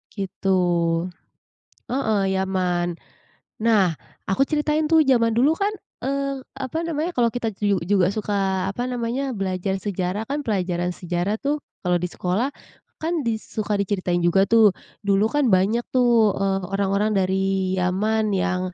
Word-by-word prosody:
Gitu. 195 -1 -5 1.4
Heeh, 220 -5 +1 0.2
Yaman. 185 -2 0 0.8
Nah, 220 -4 +5 0.4
aku 195 +8 +2
ceritain 300 +1 +1
tuh 325 -1 +6
zaman 230 -3 +4
dulu 255 +8 +3
kan, 400 +4 0 0.3
eee, 275 0 -2 0.2
apa 290 +5 -3
namanya, 325 +1 -1
kalau 235 -2 +2
kita 240 -1 -2
juju 200 -1 +1
juga 190 -2 +3
suka 205 0 -3 0.4
apa 220 +5 -4
namanya, 250 +3 -2
belajar 190 0 -1
sejarah 190 +1 -3
kan 290 +4 -2
pelajaran 180 -6 -1
sejarah 180 +4 -2
tuh 290 +3 -1 0.2
kalau 180 0 +3
di 180 - -1
sekolah, 190 +12 -1 0.5
kan 330 +1 0
di 230 -1 +1
suka 215 -1 -3
diceritain 185 -3 0
juga 195 +3 +4
tuh, 225 -3 +6 0.3
dulu 200 +1 +3
kan 290 -2 +2
banyak 210 +6 +2
tuh, 235 -4 +4
eee, 195 0 0
orang-orang 200 +2 +1
dari 190 -1 +1 0.4
Yaman 210 +4 +1
yang, 185 -1 0
210 Hz, 140 wpm, -23 LUFS, 190-245 Hz, 1.4 s, tuh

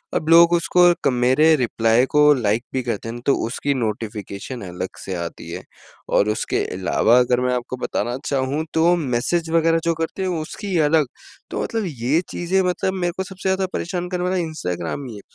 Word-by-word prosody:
अब 155 - -1
लोग 170 +1 +7
उसको 175 +1 +4
क - - +5
मेरे 130 +6 +4
रिप्लाई 115 -1 +2
को 150 0 +6
लाइक 115 -3 0
भी 130 -1 -1
करते 115 -2 -3
हैं 115 - -5
ना, 120 - -8
तो 140 - +4
उसकी 140 +4 -1
नोटिफ़िकेशन 110 -1 -4
अलग 90 +1 -5 0.2
से 95 - -4
आती 85 -1 -6
है। - - -6 0.5
और 105 - +3
उसके 105 - -1
अलावा 110 +5 +3
अगर 125 0 +2
मैं 125 0 +1
आपको 125 +1 -4
बताना 120 +4 -2
चाहूँ, 140 +3 -1
तो 170 +2 +4
मैसेज 160 +3 -1
वग़ैरह 165 0 +3
जो 170 - +2
करते 165 +4 -3
हैं, 185 - -1
उसकी 185 +4 -4
अलग। 155 -3 +3 0.4
तो - - -2
मतलब 225 -1 -2
ये 140 +2 0
चीज़ें 185 +2 0
मतलब 180 +1 -1
मेरे 175 -2 -1
को 190 - -1
सबसे 190 0 -4
ज़्यादा 190 0 +1
परेशान 180 0 -3
करने 180 -1 -2
वाला 185 +1 0
इंस्टाग्राम 140 - -3
ही 115 - -8
है 100 - -10
140 Hz, 195 wpm, -21 LUFS, 120-175 Hz, 0.5 s, लोग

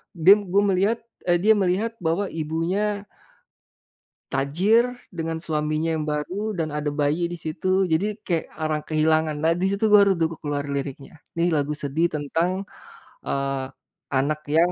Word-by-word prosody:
dim 195 +4 +6
gue 200 +1 +4
melihat, 200 +4 +2 0.3
eee, 175 - +4
dia 220 +2 +5
melihat 200 +4 +1
bahwa 175 +4 0
ibunya 180 +7 -1 1.3
tajir 185 - +3 0.2
dengan 165 -1 -3
suaminya 155 0 -1
yang 155 - -1
baru 185 +8 -2
dan 160 -1 0
ada 150 0 -2
bayi 150 +4 0
di - - -4
situ, 185 +5 +1
jadi 205 +6 +1
kayak 170 -3 0
orang 155 -1 -1
kehilangan. 155 0 +2
Nah, 165 +1 +4
disitu 200 +3 +1
baru 200 -1 +7
tuh 165 - +3
ku - - -7
keluar 145 -1 -2
liriknya, 140 0 -5 0.3
nih 170 +1 +3
lagu 145 0 0
sedih 155 +5 +1
tentang, 170 +6 -1 0.6
eee, 135 -1 -1 0.5
anak 145 +3 +1 0.2
yang 175 +2 +4
165 Hz, 145 wpm, -24 LUFS, 150-195 Hz, 1.3 s, baru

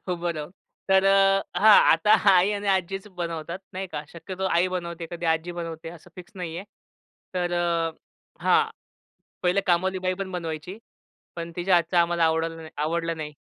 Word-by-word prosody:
उभं 175 -1 -1
राहून. 150 +1 -6 0.4
तर 190 0 +5
अ, 195 0 +4 0.2
हां 215 0 +8 0.2
आता 165 +6 +3 0.2
आई 185 +2 +4
आणि 205 0 -4
आज्जीच 195 +1 -1
बनवतात 170 0 -4
नाही 190 +1 -4
का 150 - -3
शक्यतो 185 +3 -5
आई 170 +2 +3
बनवते, 170 -2 -5
कधी 170 -1 -4
आजी 165 +2 0
बनवते 165 -1 -6
असं 170 +1 -13
फिक्स 180 0 -11
नाहीये. 175 0 -5 0.7
तर 175 -1 -1
अ, 170 -1 0 0.5
हां. 450 0 +5 0.8
पहिले 180 +2 +2
कामवालीबाई 185 +1 +1
पण 190 0 -5
बनवायची, 170 +1 -5 0.6
पण 170 0 -6
तिच्या 180 +1 +2
हातच 175 +1 0
आम्हाला 170 -1 +3
आवडल 160 0 -1
आवडलं 165 +2 -1
नाही. 150 -1 -6
175 Hz, 155 wpm, -25 LUFS, 165-185 Hz, 0.8 s, हां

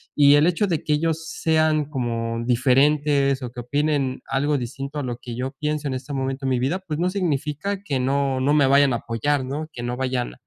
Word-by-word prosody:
Y 145 -1 +6
el 145 +1 +5
hecho 180 +4 +1
de 165 -5 -1
que 150 - +1
ellos 160 +1 -1
sean 155 -1 +1
como 115 -4 -3
diferentes 140 +2 +3
o 125 - -5
que 120 - -7
opinen 140 0 -1
algo 145 +2 +1
distinto 135 +4 -5
a - - -3
lo 120 -2 -4
que 120 -1 -8
yo 130 +2 -3
pienso 150 -1 -2
en 130 - -2
este 140 +3 -6
momento 135 0 -3
de 130 - +1
mi 125 - +1
vida, 135 +8 0
pues 165 -5 -5
no 180 - +1
significa 180 +1 -2
que 140 -10 -1
no 135 0 0
no 140 +3 +2
me 145 -3 +4
vayan 140 -1 +4
a - - +1
apoyar, 130 +5 -1
¿no? 150 +4 -4
Que 120 - -7
no 120 +1 -3
vayan 130 -2 -2
140 Hz, 225 wpm, -23 LUFS, 130-150 Hz, -, Y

